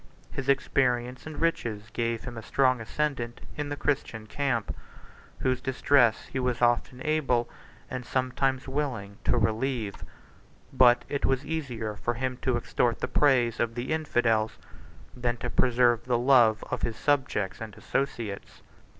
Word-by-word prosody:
His 135 Hz, 0 st, -4 dB
experience 125 Hz, -1 st, +1 dB
and 155 Hz, -, -7 dB
riches 115 Hz, -10 st, -1 dB
gave 115 Hz, -1 st, -1 dB
him 120 Hz, -, -7 dB
a 115 Hz, -, -6 dB
strong 130 Hz, +1 st, +2 dB
ascendant 120 Hz, -1 st, -2 dB, 0.2 s
in 150 Hz, -1 st, -3 dB
the 145 Hz, -, -2 dB
Christian 125 Hz, -6 st, -2 dB
camp, 120 Hz, -3 st, -1 dB, 0.7 s
whose 130 Hz, -1 st, +1 dB
distress 130 Hz, -3 st, +3 dB
he 130 Hz, -, -4 dB
was 125 Hz, -1 st, 0 dB
often 120 Hz, +1 st, +1 dB
able, 135 Hz, -6 st, +1 dB, 0.4 s
and 130 Hz, -1 st, -5 dB
sometimes 130 Hz, +1 st, -1 dB
willing, 125 Hz, -8 st, -3 dB
to 125 Hz, -, +3 dB
relieve. 110 Hz, 0 st, -1 dB, 0.7 s
But 125 Hz, -2 st, +5 dB
it 140 Hz, -, -3 dB
was 135 Hz, +1 st, +1 dB
easier 125 Hz, -9 st, -3 dB
for 120 Hz, +3 st, -2 dB
him 130 Hz, +1 st, -2 dB
to 130 Hz, -1 st, 0 dB
extort 120 Hz, 0 st, 0 dB
the -, -, -1 dB
praise 125 Hz, -6 st, +3 dB
of 115 Hz, -1 st, 0 dB
the 120 Hz, +4 st, -3 dB
Infidels, 115 Hz, -8 st, +1 dB, 0.6 s
than 120 Hz, -1 st, -1 dB
to 120 Hz, 0 st, -4 dB
preserve 120 Hz, -2 st, +3 dB
the 125 Hz, -1 st, +2 dB
love 120 Hz, -3 st, +5 dB
of -, -, -2 dB
his 115 Hz, -, -1 dB
subjects 120 Hz, -8 st, 0 dB
and 110 Hz, -3 st, -7 dB
associates. 115 Hz, -7 st, -3 dB
125 Hz, 150 wpm, -28 LUFS, 115-135 Hz, 0.7 s, But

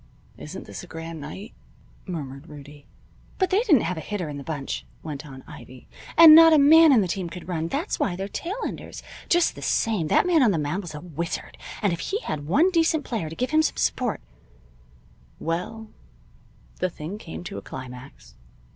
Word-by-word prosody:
"Isn't 170 Hz, +6 st, -8 dB
this -, -, -8 dB
a -, -, -11 dB
grand 165 Hz, -1 st, -7 dB
night?" 190 Hz, +9 st, -8 dB, 0.5 s
murmured 145 Hz, -4 st, -6 dB
Rudie. 145 Hz, 0 st, -13 dB, 0.5 s
"But 375 Hz, -1 st, 0 dB
they 385 Hz, -, +4 dB
didn't 360 Hz, -, +4 dB
have 175 Hz, +1 st, -2 dB
a -, -, -4 dB
hitter 180 Hz, -1 st, -4 dB
in 145 Hz, -, -6 dB
the -, -, -8 dB
bunch," 145 Hz, -2 st, -4 dB, 0.2 s
went 150 Hz, -1 st, -6 dB
on 130 Hz, -2 st, -11 dB
Ivy. 130 Hz, 0 st, -13 dB, 0.3 s
"And 330 Hz, -2 st, +11 dB
not 325 Hz, 0 st, +9 dB
a -, -, +7 dB
man 315 Hz, +2 st, +7 dB
in 245 Hz, -5 st, +5 dB
the 190 Hz, -, 0 dB
team 180 Hz, 0 st, -3 dB
could 175 Hz, +1 st, -9 dB
run. 165 Hz, -3 st, -2 dB
That's 300 Hz, -, -3 dB
why 180 Hz, -, 0 dB
they're 195 Hz, +2 st, -4 dB
tail 345 Hz, -, -5 dB
enders. -, -, -8 dB, 0.3 s
Just 345 Hz, 0 st, +3 dB
the -, -, -11 dB
same, 210 Hz, -8 st, 0 dB
that -, -, +3 dB
man 345 Hz, -4 st, +4 dB
on 245 Hz, -, +5 dB
the 185 Hz, -, +1 dB
mound 150 Hz, +6 st, -2 dB
was 170 Hz, -5 st, -8 dB
a 150 Hz, -, -7 dB
wizard, 170 Hz, -1 st, -5 dB, 0.3 s
and 200 Hz, -4 st, +2 dB
if 170 Hz, -, -4 dB
he 405 Hz, -, -2 dB
had 145 Hz, -, -5 dB
one 310 Hz, -, +3 dB
decent 325 Hz, -3 st, +2 dB
player 210 Hz, -10 st, -3 dB
to 160 Hz, -, -8 dB
give 255 Hz, -, -2 dB
him 310 Hz, 0 st, +4 dB
some 315 Hz, -, -1 dB
support 245 Hz, -4 st, -1 dB, 0.6 s
" -, -, -30 dB
Well, 215 Hz, +6 st, -4 dB, 0.9 s
the 185 Hz, -, 0 dB
thing 175 Hz, +5 st, -7 dB
came 80 Hz, -, -8 dB
to 100 Hz, -, -6 dB
a -, -, -12 dB
climax. 125 Hz, -, -10 dB
175 Hz, 205 wpm, -24 LUFS, -, 0.9 s, And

